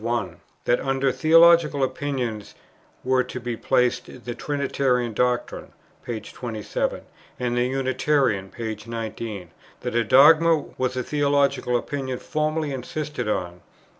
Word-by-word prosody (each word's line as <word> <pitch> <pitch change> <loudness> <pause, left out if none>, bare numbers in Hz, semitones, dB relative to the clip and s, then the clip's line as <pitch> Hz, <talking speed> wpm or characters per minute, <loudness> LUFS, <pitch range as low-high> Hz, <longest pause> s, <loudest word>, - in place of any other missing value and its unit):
1; 115 -3 -2 0.3
that 120 - +3
under 135 0 0
Theological 160 -2 +5
Opinion 130 -6 -2 0.6
were 130 0 +2
to 125 - -6
be 120 -1 -4
placed 125 +1 0
the 120 - -3
Trinitarian 130 -3 -1
doctrine, 125 +2 -1 0.3
p. 115 -2 -4
27, 110 0 -4 0.4
and 120 -1 -1
the 120 0 +2
Unitarian, 130 -5 0
p. 110 0 -5
19; 110 -5 -6 0.3
that - - -4
a 120 0 +2
dogma 155 +7 +6 0.2
was 130 0 -1
a 125 - -1
theological 140 -4 +1
opinion 130 0 -4
formally 155 +1 -2
insisted 145 0 -4
on, 90 -4 -2
pp. - - -25
125 Hz, 130 wpm, -24 LUFS, 115-140 Hz, 0.6 s, dogma